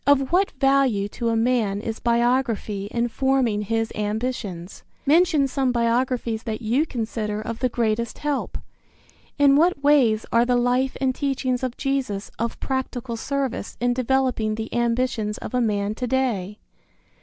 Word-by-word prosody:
Of 275 Hz, -1 st, +3 dB
what 375 Hz, +3 st, +3 dB
value 270 Hz, -7 st, +3 dB
to 235 Hz, +2 st, -2 dB
a 230 Hz, -, +1 dB
man 225 Hz, -4 st, +1 dB
is 225 Hz, +1 st, -5 dB
biography 235 Hz, -4 st, 0 dB
in 235 Hz, +2 st, 0 dB
forming 255 Hz, -4 st, +1 dB
his 225 Hz, +2 st, -1 dB
ambitions? 210 Hz, -4 st, -4 dB, 0.2 s
Mention 310 Hz, -1 st, +4 dB
some 265 Hz, -1 st, 0 dB
biographies 235 Hz, -1 st, 0 dB
that 225 Hz, 0 st, -5 dB
you 255 Hz, +9 st, +1 dB
consider 220 Hz, -4 st, -3 dB
of 225 Hz, +1 st, -5 dB
the 255 Hz, -, +1 dB
greatest 230 Hz, -1 st, -1 dB
help. 295 Hz, -2 st, -2 dB, 0.8 s
In 285 Hz, -1 st, +5 dB
what 315 Hz, -1 st, +3 dB
ways 255 Hz, -7 st, +4 dB
are 230 Hz, 0 st, +4 dB
the 245 Hz, 0 st, +2 dB
life 250 Hz, +2 st, +1 dB
and 260 Hz, -1 st, +1 dB
teachings 260 Hz, -2 st, -1 dB
of 255 Hz, -2 st, -3 dB
Jesus 265 Hz, -8 st, -2 dB
of 230 Hz, +1 st, -2 dB
practical 260 Hz, -2 st, -3 dB
service 265 Hz, -1 st, -3 dB
in 245 Hz, 0 st, +1 dB
developing 255 Hz, -3 st, 0 dB
the 220 Hz, 0 st, -5 dB
ambitions 235 Hz, -3 st, 0 dB
of -, -, -8 dB
a 250 Hz, -, +2 dB
man 205 Hz, -2 st, 0 dB
to 250 Hz, +3 st, -4 dB
day? 225 Hz, -7 st, -1 dB
240 Hz, 155 wpm, -23 LUFS, 220-265 Hz, 0.8 s, In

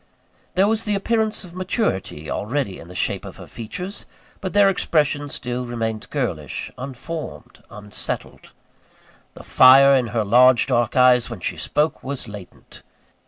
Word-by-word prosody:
There 190 Hz, +2 st, +4 dB
was 220 Hz, +1 st, +1 dB
the 210 Hz, -1 st, 0 dB
appearance 220 Hz, +2 st, -1 dB
of 175 Hz, -2 st, -12 dB
maturity 185 Hz, -, -2 dB
already 115 Hz, -, -3 dB
in 85 Hz, -, -12 dB
the 90 Hz, -, -12 dB
shape -, -, -1 dB
of -, -, -10 dB
her -, -, -10 dB
features; 180 Hz, -, -7 dB, 0.3 s
but 185 Hz, -, -5 dB
their 205 Hz, -1 st, +5 dB
expression 150 Hz, -6 st, 0 dB
still 125 Hz, -1 st, -3 dB
remained 115 Hz, -2 st, -4 dB
girlish, -, -, -4 dB
unformed, 140 Hz, +5 st, -8 dB
unsettled. 105 Hz, -1 st, -5 dB, 0.8 s
The -, -, -11 dB
fire 135 Hz, +2 st, +7 dB
in 130 Hz, -3 st, +2 dB
her 115 Hz, -1 st, -1 dB
large 125 Hz, +4 st, +5 dB
dark 120 Hz, -1 st, 0 dB
eyes, 125 Hz, -2 st, +5 dB
when 120 Hz, -4 st, -7 dB
she -, -, -2 dB
spoke, 150 Hz, +2 st, -1 dB
was 135 Hz, -2 st, -5 dB
latent. 105 Hz, -3 st, -12 dB
130 Hz, 150 wpm, -21 LUFS, 115-180 Hz, 0.8 s, fire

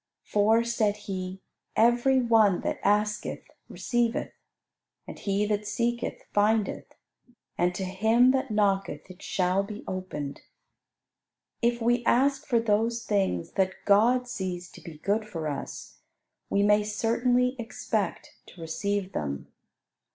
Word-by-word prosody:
For, 220 Hz, +3 st, +3 dB
said 220 Hz, -3 st, 0 dB
He, 185 Hz, -1 st, -5 dB, 0.3 s
"every 240 Hz, +3 st, +4 dB
one 225 Hz, -6 st, +4 dB
that -, -, -2 dB
asketh 210 Hz, +1 st, 0 dB, 0.3 s
receiveth; 240 Hz, -1 st, -1 dB, 0.7 s
and -, -, -9 dB
he 200 Hz, +1 st, 0 dB
that 210 Hz, 0 st, -1 dB
seeketh 235 Hz, +2 st, -2 dB
findeth; 210 Hz, 0 st, +1 dB, 0.6 s
and 180 Hz, +1 st, +1 dB
to 190 Hz, -, -3 dB
him 220 Hz, +7 st, +4 dB
that 265 Hz, 0 st, 0 dB
knocketh 200 Hz, -3 st, 0 dB
it 185 Hz, -, -15 dB
shall 185 Hz, +1 st, +1 dB
be 210 Hz, +2 st, -7 dB
opened." 165 Hz, -7 st, -5 dB, 1.2 s
If 235 Hz, 0 st, +1 dB
we 240 Hz, +1 st, +2 dB
ask 275 Hz, +2 st, +2 dB
for 240 Hz, -4 st, +3 dB
those 230 Hz, +1 st, 0 dB
things 190 Hz, -, 0 dB
that 190 Hz, -1 st, 0 dB
God 240 Hz, +5 st, +4 dB
sees 185 Hz, -6 st, -5 dB
to -, -, -13 dB
be 160 Hz, -3 st, -10 dB
good 205 Hz, +7 st, 0 dB
for 165 Hz, -7 st, -5 dB
us, 145 Hz, -2 st, -6 dB, 0.5 s
we 200 Hz, -, +2 dB
may 210 Hz, +1 st, +5 dB
certainly 245 Hz, +4 st, +1 dB
expect 230 Hz, 0 st, -3 dB
to -, -, -15 dB
receive 195 Hz, +4 st, -2 dB
them. 70 Hz, -2 st, -4 dB
210 Hz, 130 wpm, -27 LUFS, 190-235 Hz, 1.2 s, may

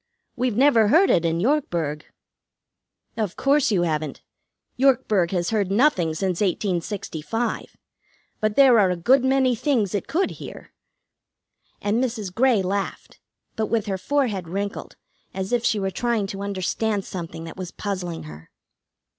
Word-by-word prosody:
We've 245 Hz, -3 st, -1 dB
never 250 Hz, -5 st, +5 dB
heard 335 Hz, -, +5 dB
it 170 Hz, -, +2 dB
in 165 Hz, 0 st, 0 dB
Yorkburg." 170 Hz, -, -1 dB, 1.1 s
"Of 215 Hz, -5 st, -2 dB
course 280 Hz, 0 st, +2 dB
you 190 Hz, -5 st, +2 dB
haven't. 155 Hz, -3 st, -2 dB, 0.5 s
Yorkburg 230 Hz, -9 st, +2 dB
has 175 Hz, 0 st, -1 dB
heard 205 Hz, -4 st, 0 dB
nothing 195 Hz, -, +2 dB
since 185 Hz, +1 st, -1 dB
1865. 195 Hz, +2 st, -2 dB, 0.6 s
But 215 Hz, -1 st, 0 dB
there 260 Hz, -5 st, +6 dB
are 195 Hz, -3 st, +4 dB
a 180 Hz, -, 0 dB
good 255 Hz, +10 st, +3 dB
many 260 Hz, -1 st, +3 dB
things 230 Hz, -, 0 dB
it 205 Hz, -, -2 dB
could 370 Hz, +4 st, 0 dB
hear." -, -, -10 dB, 1.1 s
And 215 Hz, +5 st, +1 dB
Mrs. 220 Hz, -7 st, -3 dB
Grey 235 Hz, -2 st, +3 dB
laughed, 195 Hz, +2 st, -4 dB, 0.4 s
but 220 Hz, -1 st, -1 dB
with 225 Hz, -3 st, 0 dB
her 195 Hz, -2 st, -3 dB
forehead 220 Hz, -, -1 dB
wrinkled, 200 Hz, +4 st, -4 dB, 0.4 s
as 190 Hz, +4 st, -3 dB
if 240 Hz, -1 st, +1 dB
she 215 Hz, -, +1 dB
were 195 Hz, -1 st, -1 dB
trying 235 Hz, -1 st, 0 dB
to 195 Hz, 0 st, -6 dB
understand 200 Hz, +1 st, -2 dB
something 165 Hz, -3 st, -7 dB
that 165 Hz, -, -8 dB
was 185 Hz, -2 st, -5 dB
puzzling 180 Hz, -5 st, -4 dB
her. 75 Hz, +1 st, -12 dB
205 Hz, 145 wpm, -23 LUFS, 180-240 Hz, 1.1 s, there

